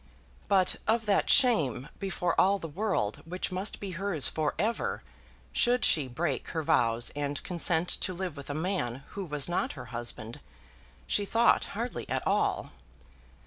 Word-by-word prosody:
But 190 -2 +3
of 225 +1 +2
that 205 -2 +2
shame 160 - +4
before 180 -3 -1
all 195 +2 +4
the 165 - -6
world 165 - -1
which 180 +3 -4
must 185 +3 -2
be 200 -2 -5
hers 180 -4 0
for 155 -2 -1
ever, 220 +7 -1 0.5
should 245 +1 +3
she 150 -6 +3
break 135 +3 -2
her 160 - -3
vows 115 -4 +2
and 145 0 -3
consent 170 -1 +1
to - - 0
live 180 -3 -4
with 140 -1 -9
a 145 - -3
man 155 -7 -2
who 200 - -5
was 150 -5 -1
not 185 +11 -1
her - - -8
husband, 120 -1 -4 0.7
she 205 - +2
thought 230 +4 +3
hardly 240 +2 -4
at - - -1
all. - - +1
175 Hz, 160 wpm, -29 LUFS, 145-200 Hz, 0.7 s, shame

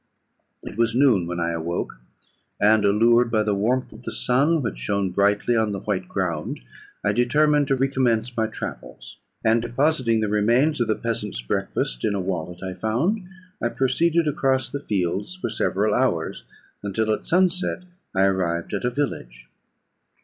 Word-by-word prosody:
"It 105 - -8
was 115 0 +2
noon 120 -10 +4
when 90 0 -3
I 85 0 0
awoke; 85 -5 -3 0.6
and, 105 +1 +4
allured 115 +4 +4
by 110 -2 +2
the 105 -1 0
warmth 120 +6 0
of 110 - -13
the - - -6
sun, 145 +5 +2
which 115 - -3
shone 100 -2 -1
brightly 100 +5 +2
on 110 -2 +1
the 100 - -3
white 95 -3 -2
ground, 85 -6 -2 0.4
I - - +2
determined 145 +4 +3
to 135 - +2
recommence 125 -3 0
my 110 -1 +1
travels; 110 - -8 0.3
and, 115 +1 +4
depositing 120 -1 +1
the 110 - 0
remains 120 +8 +2
of 120 - +1
the 110 - +1
peasant's 105 - -3
breakfast - - -2
in 105 - +1
a - - -1
wallet 90 -1 -4
I 95 -1 -4
found, 120 - 0 0.4
I 120 - +1
proceeded 160 +7 +1
across 130 -3 +1
the 140 - -3
fields 100 - -2
for 185 - -4
several 105 +2 +1
hours, 105 -10 0 0.4
until 110 +2 0
at - - -5
sunset 185 +1 +1 0.3
I 95 - +3
arrived 90 -2 0
at 100 - -2
a - - +3
village. 120 - -4
110 Hz, 165 wpm, -23 LUFS, 100-130 Hz, 0.6 s, noon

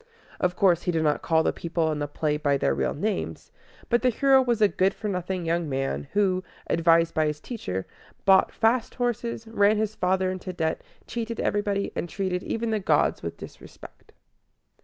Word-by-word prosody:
Of 180 0 0
course, 175 -3 +3
he 180 - -1
did 160 -2 0
not 150 -1 +1
call 160 -1 +2
the - - +1
people 165 -1 -1
in 150 - -3
the 145 - -2
play 150 +1 -1
by 145 -2 +1
their 70 - +1
real 65 -1 -1
names; 205 +6 -3 0.4
but 240 0 +2
the 255 - +3
hero 265 +2 +4
was 240 -3 0
a 210 - +6
good 195 0 +1
for 215 - -5
nothing 180 -2 -3
young 165 -1 0
man, 135 +1 -2
who, 190 -2 +2 0.2
advised 165 0 +3
by 155 -1 +2
his 150 0 -3
teacher, 95 - -5 0.4
bought 190 -1 +5
fast 230 +1 +1
horses, 235 -2 -2
ran 215 -1 +3
his 215 0 -1
father 185 -1 +1
into 185 0 -6
debt, 160 -2 -1 0.2
cheated 230 -1 -4
everybody, 205 -1 0
and 175 - -3
treated 185 -1 -2
even 225 +2 -2
the 215 - +1
gods 195 - +2
with - - -5
disrespect. - - -13
185 Hz, 190 wpm, -26 LUFS, 160-215 Hz, 0.4 s, a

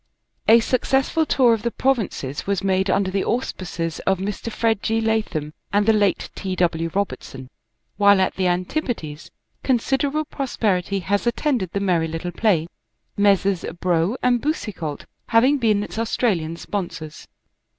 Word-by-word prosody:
A 230 +1 +7
successful 270 +6 +1
tour 245 -4 +4
of 225 - -1
the 235 - 0
provinces 215 - -1
was 200 -1 0
made 190 0 +1
under 190 0 +1
the 195 0 0
auspices 175 -8 -3
of 190 0 +3
Mr. 205 +4 -4
Fred 220 -2 0
G. 225 0 0
Latham 215 -9 -1 0.2
and 205 0 +2
the 225 - +5
late 205 -2 +1
T. 190 -2 -4
W. 165 -2 0
Robertson, 135 -9 -4 0.5
while 200 -1 +6
at 190 - +2
the 185 -1 0
Antipodes 180 - -2 0.3
considerable 275 +4 0
pros 275 -3 -5
perity 195 -2 +1
has 200 +6 0
attended 240 - 0
the 200 - 0
merry 175 -5 +1
little 165 +2 -4
play, 175 -3 +2 0.5
Messrs. 200 -2 +2 0.2
Brough 175 +4 +1
and 245 -1 +3
Boucicault 195 - -3 0.2
having 255 +5 +4
been 215 -4 +2
its 220 - -6
Australian 195 -8 0
sponsors. 170 -6 -6
200 Hz, 150 wpm, -22 LUFS, 175-230 Hz, 0.5 s, A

